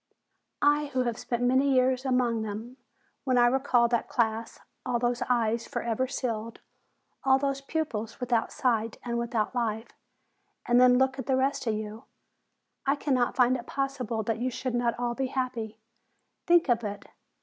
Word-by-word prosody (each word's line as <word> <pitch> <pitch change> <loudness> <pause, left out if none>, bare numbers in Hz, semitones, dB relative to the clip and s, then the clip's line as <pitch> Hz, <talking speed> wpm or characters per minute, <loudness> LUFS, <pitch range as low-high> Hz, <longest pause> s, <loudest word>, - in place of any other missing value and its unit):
"I 295 0 +3
who 260 -3 0
have 240 -2 -2
spent 240 0 -2
many 260 +3 +3
years 255 +1 +2
among 250 -3 +1
them, 220 +4 -6 0.5
when 255 -2 +1
I 240 - +6
recall 245 -1 +3
that 235 -1 0
class, 225 -1 -1 0.2
all 250 -2 0
those 240 0 -1
eyes 235 -1 +1
forever 235 +2 -1
sealed, 230 -4 -4 0.6
all 265 0 +5
those 275 0 -1
pupils 275 -8 -3
without 245 -3 0
sight 230 -3 0
and 235 -1 -2
without 235 -2 -1
life, 225 -2 -2 0.8
and 245 0 +4
then 250 0 +6
look 265 +1 +1
at 265 - -5
the 265 -1 +2
rest 265 -1 0
of 220 - +1
you, 215 +3 -6 0.8
I 275 +1 +2
cannot 260 -4 0
find 250 0 +4
it 250 -1 -6
possible 255 -5 -2
that 225 +1 -2
you 250 +2 0
should 255 0 -4
not 240 -1 0
all 240 0 -1
be 265 +2 -2
happy. 245 -5 -3 0.7
Think 345 -2 +5
of 235 -2 +2
it! 205 -1 -5
245 Hz, 170 wpm, -28 LUFS, 230-260 Hz, 0.8 s, I